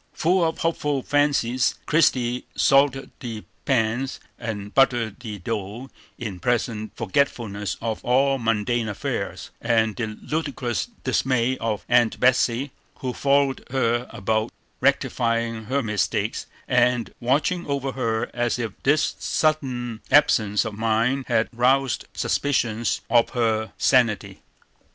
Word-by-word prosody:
Full 180 +2 +2
of 160 -1 0
hopeful 150 -5 -1
fancies, 140 -4 +2
Christie 125 -6 +2
salted 135 -1 +3
the 115 -4 -6 0.2
pans 130 +1 0 0.2
and 105 -3 -5
buttered 120 -6 +2
the 110 -4 -6
dough 110 +5 -5 0.3
in 105 -7 -5
pleasant 110 0 -1
forgetfulness 105 -4 -1
of 110 -2 -3
all 135 +2 +2
mundane 115 +1 0
affairs, 105 - -4
and 110 -2 +2
the 120 -3 -2
ludicrous 145 - -2 0.2
dismay 130 -1 +1
of 110 -2 -2
Aunt 120 -2 +3
Betsey, 130 +1 +2 0.3
who 130 -1 -2
followed 140 0 +2
her 120 -2 0
about 110 +1 -1 0.3
rectifying 115 -4 0
her 135 +4 0
mistakes, 105 -3 -1 0.2
and 125 -2 +2
watching 150 +8 0
over 140 -1 -1
her 115 -3 -2
as 120 0 0
if 115 -3 -3
this 150 +3 +2
sudden 125 -7 -1
absence 110 -8 +4
of 110 - -4
mind 115 +5 +1
had 110 - +2
roused 130 +2 +2
suspicions 120 -5 0
of 120 -1 +4
her 110 -2 +1
sanity. 115 -6 +2
120 Hz, 120 wpm, -24 LUFS, 110-135 Hz, 0.3 s, absence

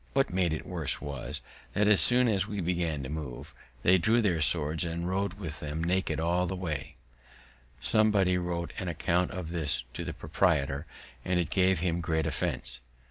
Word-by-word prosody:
What 135 -8 +2
made 90 -3 +2
it 80 - -3
worse 85 -6 -1
was, 70 -3 -5 0.3
that, 105 0 +2
as 105 -2 +7
soon 125 0 +5
as 100 -4 +1
we 105 -2 -4
began 85 -5 -1
to - - -4
move, 75 -5 -6 0.3
they 95 +1 +6
drew 110 +6 +3
their 90 -8 +1
swords 75 +5 +2
and 85 0 -3
rode 95 0 -1
with 85 -7 -6
them 75 +2 -3
naked 95 +1 0
all 90 +2 +1
the 95 - -3
way. 80 -7 -4 0.8
Somebody 100 - +3
wrote 85 -1 -2
an 95 - -4
account 85 +2 +1
of 90 -3 -5
this 75 -7 -1
to - - -4
the - - -4
proprietor, 70 +2 0 0.4
and 90 -1 +1
it 85 - -1
gave 95 -3 +3
him 85 -1 0
great 80 -1 0
offense. - - -1
85 Hz, 185 wpm, -29 LUFS, 80-95 Hz, 0.8 s, as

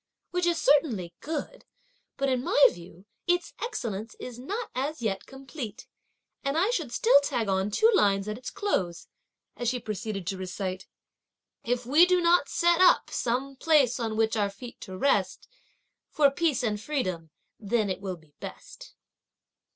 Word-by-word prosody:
"Which 360 0 0
is 340 -1 +2
certainly 235 - +2
good; 320 - -5 0.5
but 275 - 0
in 255 -2 0
my 285 - +6
view, 175 +2 -14 0.2
its 355 0 +1
excellence 225 - -4
is 245 -1 -8
not 415 - -4
as 275 +1 -3
yet 195 -3 -2
complete! 265 -4 -8 0.6
and 275 +2 -1
I 385 +7 +3
should 320 - -2
still 255 +4 +5
tag 235 -6 -1
on 190 +1 +1
two 445 - +4
lines 200 - +3
at 210 - -3
its 255 +3 -7
close;" 190 - -2 0.5
as 240 -1 -1
she 250 0 -1
proceeded 215 -3 -5
to 190 +2 -3
recite: 185 0 -4 0.8
"If 245 -1 -1
we 305 +8 +6
do 365 0 +3
not 340 -4 +3
set 345 +1 +3
up 370 - +5
some 260 +3 -1
place 280 -6 +3
on 225 -2 -2
which 220 0 +2
our 205 -2 +1
feet 235 +5 -11
to 190 0 -8
rest, 280 +8 +1 0.6
For 285 -2 +4
peace 300 -3 0
and 210 -3 -1
freedom 185 - -3 0.3
then 215 0 0
it 190 0 -3
will 190 -2 -4
be 155 -3 -24
best." - - -10
245 Hz, 165 wpm, -27 LUFS, 200-300 Hz, 0.8 s, my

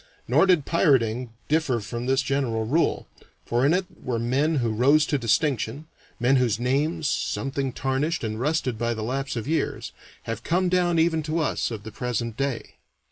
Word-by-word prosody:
Nor - - +4
did 175 -7 +3
pirating 125 -7 +2 0.2
differ 150 -6 +1
from 120 +4 -5
this 135 0 +2
general 130 -5 -1
rule, 155 +9 +1 0.4
for 120 +2 0
in - - +3
it 185 +2 +1 0.2
were 125 -2 -2
men 135 +7 +1
who 120 -5 0
rose 140 +7 +4
to 145 -2 0
distinction, 125 +3 0 0.3
men 125 +3 +3
whose 120 -4 +1
names, 145 +5 0
something 135 -1 -1
tarnished 135 +5 -1
and 110 -1 -3
rusted 130 -4 -1
by 120 0 0
the 110 - -4
lapse 135 +4 -2
of 115 +1 -4
years, 160 +1 -1 0.3
have 115 - -4
come 180 +2 +1
down 175 -1 +2
even 160 0 +2
to 155 +2 -2
us 160 - 0
of 110 -3 -6
the 110 - -8
present 115 -1 -3
day. 135 -1 -3
135 Hz, 180 wpm, -25 LUFS, 115-155 Hz, 0.4 s, Nor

